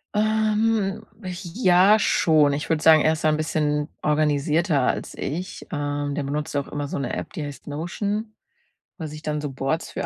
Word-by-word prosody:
Ähm, 215 -1 +1 0.5
ja 195 -1 +5
schon. 155 -7 +3
Ich 145 - -4
würde 160 -2 +1
sagen, 160 -1 +7
er 155 - +3
ist 155 0 -4
da - - +6
'n 155 - +2
bisschen 150 -1 -1
organisierter 150 +1 +1
als - - -1
ich. 175 +6 -5
Ähm, 145 -1 -2
der 145 - -2
benutzt 145 +1 -3
auch 140 - -1
immer 145 -1 -4
so - - -4
'ne 135 -3 -3
App, - - -5
die 155 - -4
heißt 145 -2 -8
Notion, 205 +8 -3 0.6
wo 165 - -7
er - - -3
sich 150 +1 -9
dann 150 -1 -2
so 145 -2 -4
Boards 135 +5 -2
für - - -3
155 Hz, 190 wpm, -24 LUFS, 145-185 Hz, 0.6 s, sagen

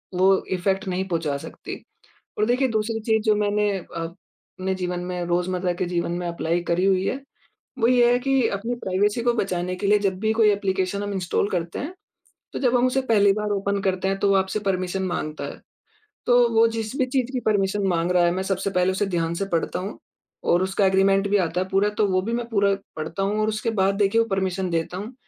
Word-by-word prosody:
वो 190 +1 +5 0.2
इफेक्ट 195 +2 -1
नहीं 185 +1 -1
पहुँचा 160 -4 -1
सकती। - - -9 0.5
और 210 - +2
देखिए, 250 +3 +2
दूसरी 225 0 -1
चीज़ 220 -1 +1
जो 215 -1 +3
मैंने 210 0 +1
अपने 185 +2 -7
जीवन 180 -1 -3
में, 180 -1 -3
रोज़मर्रा 180 +1 0
के 180 - -2
जीवन 175 -1 -2
में 175 0 -3
अप्लाई 170 0 -1
करी 180 +2 +2
हुई 190 -1 +2
है, 270 +2 -2 0.6
वो 230 - +3
ये 245 -1 +5
है 245 - +4
कि 270 -2 +2
अपनी 230 +5 -3
प्राइवेसी 205 +1 0
को 240 - +3
बचाने 185 -4 -2
के 200 - -2
लिए 210 0 +5
जब 195 -2 0
भी 220 +1 +1
कोई 220 -1 +4
ऐप्लीकेशन 195 0 -1
हम 205 - -3
इंस्टॉल 185 +1 0
करते 170 -3 -3
हैं, 305 +7 -5 0.6
तो - - -3
जब 250 -2 +3
हम 245 - +3
उसे 255 +1 +1
पहली 205 -3 +5
बार 210 0 -2
ओपन 200 0 -1
करते 190 -1 0
हैं, 195 0 -1
तो 200 - +2
वो 195 - +4
आपसे 190 +2 0
परमिशन 185 0 -1
माँगता 155 -4 -3
है। - - -7 0.7
तो 245 0 +5
वो 225 +1 +6
जिस 225 +3 -4
भी 260 - +2
चीज़ 255 -1 -1
की 255 - 0
परमिशन 200 -1 +1
माँग 170 0 +1
रहा 180 -1 +4
है, 170 - +3
मैं 190 +1 -2
सबसे 195 0 -1
पहले 180 0 +2
उसे 190 +2 0
ध्यान 170 -3 -1
से 195 +3 -2
पढ़ता 165 +2 0
हूँ, 195 +3 -6 0.5
और 175 +2 +3
उसका 190 +1 +1
एग्रीमेंट 195 +1 +3
भी 205 - +3
आता 180 -1 0
है 185 - -2
पूरा, 195 +2 +2
तो 210 0 0
वो 185 -1 +1
भी 230 - -3
मैं 235 0 -2
पूरा 200 -3 +2 0.2
पढ़ता 160 +5 -3
हूँ 205 +2 0
और 215 - +1
उसके 215 +2 -2
बाद 195 +1 +3
देखिए 210 +3 +3
वो 230 - -1
परमिशन 190 -1 -1
देता 165 +2 -2
हूँ। 210 +6 -6
195 Hz, 225 wpm, -24 LUFS, 180-215 Hz, 0.7 s, वो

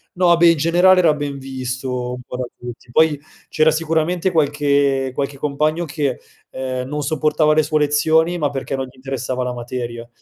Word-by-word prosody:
No, 175 -1 +4
beh, 170 0 +5
in 165 - 0
generale 175 +4 +4
era 165 -4 +4
ben 145 -1 -4
visto 130 -1 -4
un 125 - -7
po' 125 - -7
da 125 - -2
tutti. 120 0 -10
Poi, 155 +2 +3 0.3
c'era 155 0 +3
sicuramente 165 +3 0
qualche 140 -4 +1
qualche 140 +1 -3
compagno 155 +4 -1
che, 145 -3 -2 0.3
ehm, 130 -1 -4
non 150 +1 -3
sopportava 155 +1 +2
le 155 - +4
sue 155 0 0
lezioni, 160 +4 +2
ma 145 -3 +1
perché 135 0 -4
non 135 0 -3
gli 130 - -16
interessava 130 -1 -4
la 125 0 -3
materia. 120 -1 -6
145 Hz, 180 wpm, -19 LUFS, 130-155 Hz, 0.3 s, beh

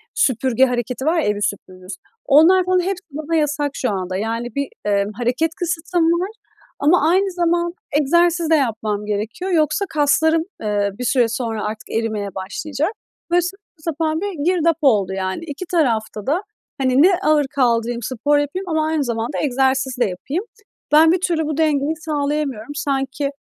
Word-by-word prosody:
süpürge 260 - +3
hareketi 250 +2 -3
var 325 +3 +2
ya - - 0
evi 210 0 0
süpürürüz. 185 -1 -5 0.3
Onlar 345 +6 +6
falan 370 0 +2
hepsi 370 +1 -2
bana 310 +3 -3
yasak 295 -2 0
şu 250 - -1
anda. 185 -1 -3
Yani, 230 +3 -3
bir, 280 -1 -1 0.2
eee, 200 -1 +2
hareket 250 +8 -1
kısıtlama 340 -1 0
var 345 +4 +1 0.5
ama 310 +1 +4
aynı 385 +2 +2
zamanda 345 0 0 0.3
egzersiz 340 +2 +2
de 320 - +5
yapmam 215 -6 -1
gerekiyor. 215 - -3
Yoksa 310 +3 +2
kaslarım, 320 +1 +2 0.2
eee, 205 -1 0
bir 250 - -3
süre 245 -1 +3
sonra 230 -3 -3
artık 215 +1 -6
erimeye 215 -3 -2
başlayacak. 275 - -3 0.4
Böyle 355 - +4
saçma 390 +4 -7
sapan 315 +1 -2
bir 375 -8 -3
girdap 335 -3 +2
oldu, 205 -9 +3
yani. 190 - -3
2 300 +4 -6
tarafta 225 - 0
da, 320 +7 +1 0.4
hani, 260 +1 +3
ne 370 +1 +5
ağır 300 -2 +3
kaldırayım, 235 -2 +1
spor 285 +5 +1
yapayım 365 +6 -3
ama 315 -1 +1
aynı 315 -2 0
zamanda 235 +1 -3
egzersiz 265 -1 +1
de 240 - +4
yapayım. 270 - -4 0.5
Ben 315 +2 +7
bir 360 0 +1
türlü 330 -3 0
bu 305 -1 -3
dengeyi 305 -1 +1
sağlayamıyorum. 290 -5 -2
Sanki, 275 -1 -1
290 Hz, 165 wpm, -20 LUFS, 230-330 Hz, 0.5 s, Ben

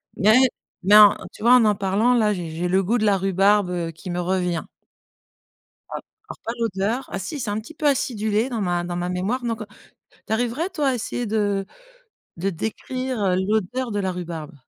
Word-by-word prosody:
Mais- 215 +4 +5 0.5
mais 205 +3 +5
en, 210 -1 +9 0.2
tu - - -15
vois? 245 +2 +7
En 220 -4 +4
parlant, 200 +6 +2
là, 215 -3 +3
j'ai 175 -1 -3
le 190 +2 +2
goût 225 +6 +1
de 215 - 0
la 200 -2 +4
rhubarbe, 195 +1 +3
heu, 170 -2 -3
qui 175 +4 -10
me 175 - -2
revient 180 -2 -1 1.3
alors 430 -1 -10
pas 230 - -3
l'odeur. 225 +4 -1
Ah 195 - -3
si, 280 - -5
c'est 235 -5 -3
un 205 +1 -1
petit 225 +9 -11
peu 305 -1 -1
acidulé 225 -3 0
dans 230 -3 -3
ma 175 -2 0
dans 175 0 -4
ma 175 0 -2
mémoire, 195 +8 -2
donc, 230 -2 -2
heu. 215 - -6 0.6
Tu - - -1
arriverais, 245 +9 -1
toi, 300 -7 0
à 255 - 0
essayer 240 +1 -3
de 205 -2 0 0.7
de 190 +4 -1
décrire, 255 +6 -4
heu, 185 -2 +2
l'odeur 220 +6 -1
de 205 -1 -1
la 190 -1 -1
rhubarbe? 170 -4 -6
205 Hz, 195 wpm, -23 LUFS, 185-235 Hz, 1.3 s, en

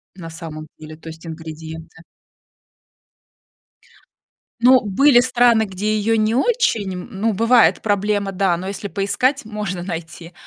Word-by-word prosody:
на 165 -3 -9
самом 160 -2 -9
деле, 155 0 -11
то 165 - -15
есть 160 +1 -12
ингредиенты 160 0 -9 2.6
Ну, 255 +1 +6
были 240 +6 +4
страны, 245 -2 +3
где 210 +2 -2
её 225 +2 +1
не 215 +1 +1
очень, 260 - +1
м, 180 +3 -7
ну, 215 +2 -1
бывает 230 +4 +3
проблема, 205 -1 0
да, 185 -2 +1
но, 185 +2 -6
если 200 +1 -5
поискать, 230 +7 -1
можно 210 -5 -5
найти. 165 -1 -7
200 Hz, 130 wpm, -20 LUFS, 165-225 Hz, 2.6 s, Ну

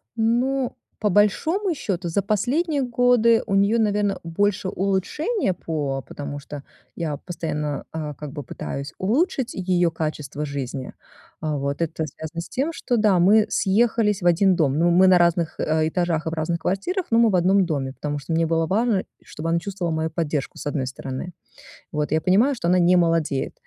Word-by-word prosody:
Ну, 245 +3 +1 0.3
по 210 - +1
большому 310 - +2
счёту 190 - -3
за 185 +5 +1
последние 275 - 0
годы 245 -2 +3
у 195 - -1
неё, 200 +4 +3
наверно, 205 -2 +1
больше 185 +3 0
улучшение 195 - -1
по 145 -6 -3
потому 145 0 -6
что 145 0 -8 0.3
я 155 -4 -3
постоянно, 150 -4 -4
э, 150 -2 -4
как 150 -1 -8
бы 145 -2 -6
пытаюсь 140 +5 -6
улучшить 260 - 0
её 175 -2 +3
качество 150 -2 -4
жизни. 135 -2 -5 0.5
Э, 150 -2 -1
вот, 140 +3 -3
это 160 -1 -2
связано 160 +4 -7
с - - -10
тем, 295 +6 -1
что 245 - -1
да, 210 -4 +3
мы 210 +5 +5
съехались 210 0 +2
в - - -3
один 180 +2 +4
дом, 145 -5 +1
ну, 170 +1 +4
мы 180 +2 +5
на 185 -1 +6
разных, 170 -1 +1
э, 155 0 +1
этажах 170 -2 -1
и - - +2
в - - -6
разных 165 +1 -1
квартирах, 200 - -2
но 230 - +5
мы 230 -1 +5
в 195 - +1
одном 185 +2 +4
доме, 135 -5 -2
потому 145 0 -4
что 140 +4 -5
мне 165 +1 +2
было 165 0 +1
важно, 215 +1 +1 0.2
чтобы 155 +2 -7
она 170 - +2
чувствовала 175 -2 -3
мою 160 0 -1
поддержку 155 -3 -3
с 145 - -4
одной 140 -3 -2
стороны. 130 +2 -5 0.7
Вот, 150 0 -1
я 155 - +3
понимаю, 220 - +3
что 170 - -3
она 180 +1 +4
не 180 +1 +5
молодеет. 165 -5 +1
175 Hz, 185 wpm, -23 LUFS, 155-210 Hz, 0.7 s, на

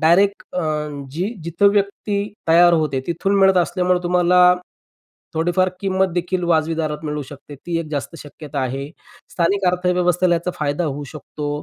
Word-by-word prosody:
Direct 195 +5 +3
अ, - - +1 0.5
जी 180 - -3
जिथं 170 +4 +3
व्यक्ती 200 0 -1 0.2
तयार 175 +1 +6
होते 155 -5 +1
तिथून 175 +4 -1
मिळत 195 -1 +5
असल्यामुळं 180 0 +1
तुम्हाला, 180 0 +4 0.8
थोडीफार 175 +3 +1
किंमत 190 -1 +1
देखील 180 +1 -1
वाजवी 165 -1 +1
दारात 155 -2 -2
मिळू 150 -1 -3
शकते, 145 0 -11
ती 165 +4 -4
एक 165 - -4
जास्त 145 +2 -4
शक्यता 145 0 -8
आहे. 135 +2 -3 0.4
स्थानिक 195 +3 0
अर्थव्यवस्थेला 180 0 +2
याचा 170 +2 -2
फायदा 150 +3 -1
होऊ 145 -2 -3
शकतो. 150 0 -6
175 Hz, 150 wpm, -20 LUFS, 155-185 Hz, 0.8 s, तयार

